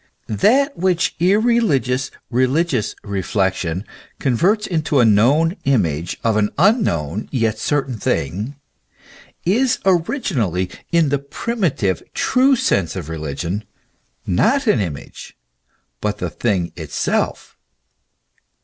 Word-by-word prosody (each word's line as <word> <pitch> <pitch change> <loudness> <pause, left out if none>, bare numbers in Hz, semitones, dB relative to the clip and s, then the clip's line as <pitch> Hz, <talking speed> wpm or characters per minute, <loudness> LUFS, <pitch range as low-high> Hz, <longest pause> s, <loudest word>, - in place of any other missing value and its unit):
That 265 - +2
which 180 -1 +1
irreligious 180 - +2 0.2
religious 130 - +1
reflection 95 -3 -1 0.3
converts 185 - +1
into 155 -4 0
a 120 - +6
known 135 - +4
image 85 - 0
of 110 -2 +2
an 105 -1 +2
unknown 110 - +1
yet 115 -4 0
certain 135 -5 -1
thing, 100 - -2 0.9
is 230 +8 +2
originally, 160 - 0 0.2
in 165 -3 +3
the 140 0 +1
primitive, 140 - -1
true 265 +2 +3
sense 90 - 0
of 85 -5 -5
religion, 80 +5 -4 0.6
not 275 - +2
an 210 - +3
image, 85 -9 -6 0.6
but - - -1
the - - -4
thing 90 -4 -1
itself. 80 -4 -2
125 Hz, 105 wpm, -19 LUFS, -, 0.9 s, a